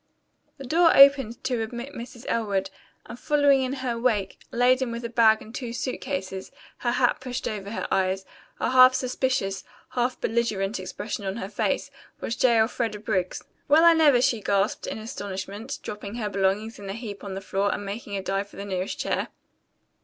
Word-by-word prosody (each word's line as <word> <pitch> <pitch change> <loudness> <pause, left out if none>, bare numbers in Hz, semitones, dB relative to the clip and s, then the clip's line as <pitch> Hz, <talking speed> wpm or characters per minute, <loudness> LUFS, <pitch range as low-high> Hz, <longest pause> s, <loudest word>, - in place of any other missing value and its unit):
The 275 - -8
door 330 +5 +4
opened 275 -4 +6
to 250 -3 -1
admit 240 +5 -5
Mrs. 240 -1 -9
Elwood, 200 -4 -1 0.3
and 235 - -9
following 285 -2 +3
in 260 0 -1
her 235 -2 -1
wake, 215 -6 0
laden 250 +1 +3
with 235 +1 -5
a - - -3
bag 225 -2 +4
and 220 - -13
two 245 -3 -5
suit 255 +2 -3
cases, 190 0 -4 0.3
her 240 -1 -1
hat 250 -1 +2
pushed 255 0 -4
over 200 -2 -4
her 225 - -3
eyes, 190 0 0 0.3
a - - 0
half 255 0 +8
suspicious, 255 -7 -1 0.3
half 245 0 -1
belligerent 215 -4 -1
expression 205 +3 -5
on 190 0 -3
her 195 -4 -5
face, 205 - -1 0.3
was 230 - -3
J. 240 -2 +4
Elfreda 225 -1 0
Briggs. 190 -4 -2 0.2
"Well 305 +3 +6
I 335 - +8
never!" 290 -6 +5
she 230 -4 +2
gasped 200 +1 0
in - - -4
astonishment, 205 +2 -6
dropping 210 0 -6
her 215 -3 -2
belongings 200 +3 0
in 200 -1 -8
a - - -3
heap 210 -3 -7
on 195 -2 -5
the - - -3
floor 195 +1 0
and 205 - -4
making 200 0 -5
a 195 - -4
dive 195 +1 -2
for - - -16
the 200 - -6
nearest 190 -1 -3
chair. - - -1
225 Hz, 190 wpm, -25 LUFS, 200-250 Hz, 0.3 s, half